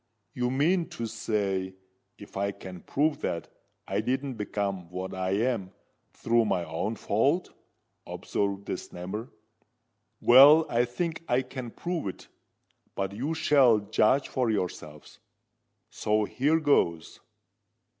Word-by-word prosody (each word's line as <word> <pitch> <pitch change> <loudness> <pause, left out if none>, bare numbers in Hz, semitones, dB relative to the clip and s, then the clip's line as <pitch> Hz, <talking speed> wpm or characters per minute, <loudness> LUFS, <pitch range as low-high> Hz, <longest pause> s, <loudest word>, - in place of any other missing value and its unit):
"You 125 0 -1
mean 165 +7 +1
to 115 - -2
say, 100 -4 -2 0.4
if - - -13
I 100 +1 0
can 90 -3 -10
prove 150 +2 0
that 85 - -3 0.4
I 100 +2 0
didn't 130 +4 -2
become 100 -5 -3
what 90 +1 -5
I 95 0 -2
am 110 -3 -1 0.4
through 115 0 +1
my 90 -4 0
own 85 +8 -3
fault?" 140 - 0 0.6
observed 100 0 -3
the - - -3
Snammer. 100 +8 -7 0.9
"Well—I 130 -1 +7
think 165 +7 -4
I 125 +2 +2
can 130 -3 -7
prove 170 - -4
it. 95 - -8 0.7
But 95 0 -2
you 140 +10 -2
shall 135 -7 +5
judge 110 +6 +2
for 125 -3 0
yourselves. 85 -7 -4 0.7
So, 105 0 0
here 145 +9 +1
goes." 85 - +1
110 Hz, 125 wpm, -28 LUFS, 95-135 Hz, 0.9 s, Well—I